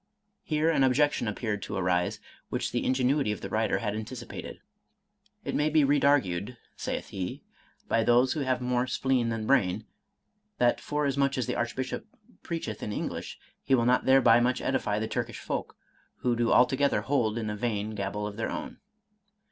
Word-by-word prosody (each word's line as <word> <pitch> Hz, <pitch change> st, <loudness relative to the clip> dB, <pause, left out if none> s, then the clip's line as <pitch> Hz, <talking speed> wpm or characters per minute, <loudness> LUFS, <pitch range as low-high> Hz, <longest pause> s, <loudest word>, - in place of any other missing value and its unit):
Here 155 Hz, 0 st, 0 dB
an 140 Hz, -, +3 dB
objection 135 Hz, 0 st, +2 dB
appeared 105 Hz, -1 st, -2 dB
to -, -, -5 dB
arise, 90 Hz, -1 st, 0 dB, 0.3 s
which -, -, -2 dB
the -, -, -1 dB
ingenuity 130 Hz, -1 st, +2 dB
of 105 Hz, -, -4 dB
the 95 Hz, -, -5 dB
writer 110 Hz, +1 st, +1 dB
had 105 Hz, -2 st, -2 dB
anticipated. 115 Hz, +2 st, -7 dB, 0.3 s
— -, -, -49 dB
" -, -, -40 dB
It -, -, -2 dB
may 150 Hz, +1 st, +2 dB
be 155 Hz, -1 st, +4 dB
redargued," 130 Hz, -7 st, +2 dB, 0.2 s
saith -, -, -4 dB
he, 90 Hz, -2 st, -5 dB, 0.2 s
" -, -, -35 dB
by 115 Hz, -, +2 dB
those 120 Hz, +3 st, +4 dB
who 155 Hz, -, -3 dB
have 130 Hz, -2 st, 0 dB
more 125 Hz, 0 st, +1 dB
spleen 130 Hz, -1 st, +1 dB
than 115 Hz, -1 st, -2 dB
brain, 110 Hz, -5 st, +2 dB, 0.7 s
that 120 Hz, 0 st, +2 dB
forasmuch 140 Hz, -2 st, 0 dB
as 125 Hz, -, 0 dB
the -, -, -2 dB
Archbishop 120 Hz, +2 st, -3 dB, 0.3 s
preacheth 160 Hz, -11 st, -4 dB
in 105 Hz, -, -3 dB
English, -, -, -4 dB, 0.3 s
he 135 Hz, -, +3 dB
will 120 Hz, -2 st, +2 dB
not 125 Hz, +1 st, +3 dB
thereby 130 Hz, -3 st, +6 dB
much 125 Hz, +1 st, +1 dB
edify 110 Hz, -6 st, 0 dB
the 110 Hz, +1 st, -1 dB
Turkish -, -, -3 dB
folk, -, -, -4 dB, 0.5 s
who 125 Hz, -1 st, +1 dB
do 115 Hz, 0 st, +1 dB
altogether 135 Hz, +3 st, +4 dB
hold 120 Hz, -6 st, 0 dB
in 110 Hz, -2 st, -2 dB
a -, -, -3 dB
vain 110 Hz, -2 st, -2 dB
gabble 105 Hz, 0 st, -3 dB
of 105 Hz, 0 st, -6 dB
their 115 Hz, -, -2 dB
own." -, -, -6 dB
120 Hz, 180 wpm, -28 LUFS, 110-135 Hz, 0.7 s, thereby